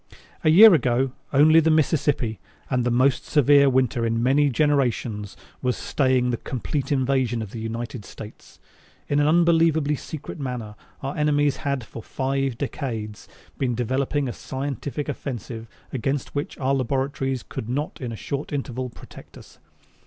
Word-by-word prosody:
A - - +4
year 205 +6 +9
ago 130 -3 +2 0.2
only 155 +3 +6
the 160 0 +3
Mississippi 145 -7 +1 0.3
and 125 -1 +1
the 120 - +1
most 130 +3 +2
severe 145 -1 +5
winter 125 -2 +1
in 115 0 0
many 140 +3 +3
generations 120 -7 0 0.2
was 125 -1 0
staying 130 -3 +1
the 120 - -1
complete 135 +3 -4
invasion 130 -4 +1
of 100 - -9
the 115 - -6
United 115 0 -5
States. 105 +2 -12 0.5
In 145 - +1
an 145 - +3
unbelievably 160 -3 +3
secret 155 +3 -8
manner 125 -6 -4 0.3
our 135 +1 -3
enemies 145 -2 +2
had 140 -3 -2
for 115 - -9
five 135 0 -2
decades 115 -7 -5 0.3
been 125 -3 0
developing 130 +4 -1
a 120 - -3
scientific 140 +2 -4
offensive 120 -5 -5 0.3
against 135 +2 -2
which 145 +5 -4
our 135 0 0
laboratories 135 0 -1
could 110 - -7
not 145 +4 -3
in 125 -2 -4
a - - -5
short 140 +6 -5
interval 130 -3 -3
protect - - -14
us. - - -16
135 Hz, 150 wpm, -24 LUFS, 120-145 Hz, 0.5 s, year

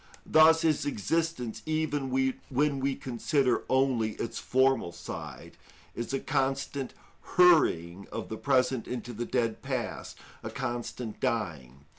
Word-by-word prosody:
Thus 160 +1 +6
his 155 -2 +2
existence, 135 - -1
even 155 -3 -1
when 135 +2 0
we 135 0 0
consider 130 +1 0
only 130 -5 +2
its 115 - -4
formal 130 -8 +2
side, - - -8 0.4
is 120 - -4
a 135 - 0
constant 135 0 -1 0.4
hurrying 100 - +4
of - - -5
the 110 - -5
present 130 -2 +1
into 120 -1 -5
the 120 +2 -3
dead 115 -3 0
past, - - -4 0.2
a - - -5
constant 120 -2 -4
dying. 70 - -3
130 Hz, 125 wpm, -29 LUFS, 115-140 Hz, 0.4 s, Thus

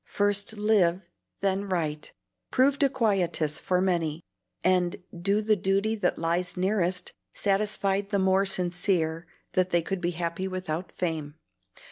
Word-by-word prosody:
"First 205 +1 +1
live, 190 -4 +2 0.3
then 195 0 0
write," 155 -5 -2 0.4
proved 275 +2 +3
a 280 - +5
quietus 185 - 0
for 180 -1 +1
many, 170 -4 0 0.4
and 180 -1 +2 0.2
"Do 200 +5 +1
the 215 0 +3
duty 195 +3 +1
that 215 - 0
lies 175 +2 -1
nearest" 185 -1 0 0.2
satisfied 200 -1 0
the 200 - +1
more 190 +1 +3
sincere 175 -3 0 0.3
that 185 0 +2
they 170 -2 +2
could 195 +1 -3
be 175 - +1
happy 170 +2 -2
without 180 -2 -4
fame. 160 -4 -3
185 Hz, 135 wpm, -27 LUFS, 170-200 Hz, 0.4 s, a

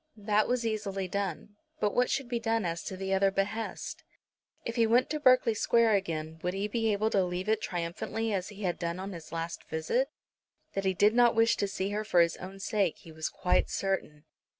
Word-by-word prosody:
That 210 0 +2
was 245 -1 0
easily 200 -4 -2
done; 200 +2 -4 0.2
but 210 - +1
what 250 0 +2
should 275 -2 -1
be 240 -1 -1
done 225 -2 0
as 170 0 -2
to 190 - -5
the 190 0 -2
other 195 0 +4
behest? 205 +3 -3 0.6
If 230 - -3
he 230 -2 +4
went 245 +5 +3
to 305 - -1
Berkeley 255 -5 +5
Square 230 +1 +3
again, 160 -5 -2
would 180 +1 -2
he 200 +2 -1
be 225 0 0
able 215 +2 +1
to 195 - +3
leave 180 +2 -3
it 220 0 +2
triumphantly 180 +6 -2
as 185 -1 -2
he 210 0 -9
had 180 -2 -1
done 170 +1 -2
on 195 +1 -5
his 165 -3 -10
last 165 0 -4
visit? 235 - 0 0.6
That 195 0 -2
he 190 -1 +2
did 210 +4 +4
not 240 0 +5
wish 225 +1 +4
to 200 - 0
see 195 0 -2
her 210 +1 -1
for 210 -5 +2
his 170 0 +2
own 190 +2 -9
sake 195 -3 0
he 165 - -14
was 160 0 -3
quite 180 - +1
certain. 190 -6 -2
200 Hz, 220 wpm, -30 LUFS, 180-225 Hz, 0.6 s, Berkeley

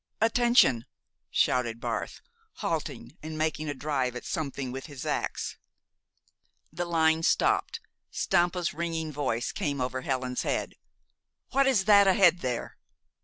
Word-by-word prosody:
"Attention!" 225 - +4 0.4
shouted 120 -3 +1
Barth, - - -4 0.3
halting - - -4
and 155 0 -6
making 155 -1 -1
a 145 - -3
drive 130 -3 -1
at 125 - -7
something 140 -4 -3
with 135 +3 -6
his 140 -4 -8
ax. - - -3 1.1
The 175 - -2
line 160 -1 +2
stopped. 460 - +1 0.3
Stampa's 175 -1 +1
ringing 165 -1 -3
voice 130 -5 -2
came 140 -2 -2
over 130 +1 -2
Helen's 130 -1 -2
head: - - -2 0.8
"What 275 +1 +3
is 225 -8 +3
that 200 -1 +7
ahead 180 -2 +5
there?" 125 -5 -4
155 Hz, 125 wpm, -28 LUFS, 130-175 Hz, 1.1 s, that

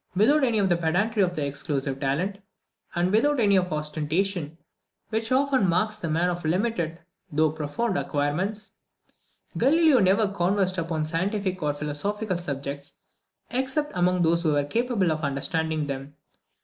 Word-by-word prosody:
Without 275 +10 +4
any 235 -4 +2
of 200 -2 +3
the 175 -2 +2
pedantry 190 +7 +1
of 180 -3 +1
exclusive 140 -1 -2
talent, 165 +9 -1 0.6
and 175 +1 +1
without 280 +7 +3
any 205 -3 +4
of 180 -1 +2
that 155 - -2
ostentation 155 +2 -1 0.5
which 225 +1 -2
often 260 -6 +3
marks 215 +5 +1
the 175 -6 -4
man 165 +3 +1
of 175 0 -2
limited 170 -1 -1 0.3
though 155 +1 +2
profound 160 +8 -2
acquirements, 175 +9 -2 0.9
Galileo 310 -1 +5
never 200 +3 +3
conversed 190 -1 0
upon 165 -2 -2
scientific 185 +3 -1
or 150 -1 0
philosophical 185 +7 -2
subjects 140 -3 -5 0.6
except 270 +4 -1
among 180 0 +2
those 170 +1 +3
who 160 -3 +1
were 145 0 +2
capable 225 - 0
of 155 0 -2
understanding 155 +2 -1
them. 140 0 -6
180 Hz, 150 wpm, -25 LUFS, 155-210 Hz, 0.9 s, Galileo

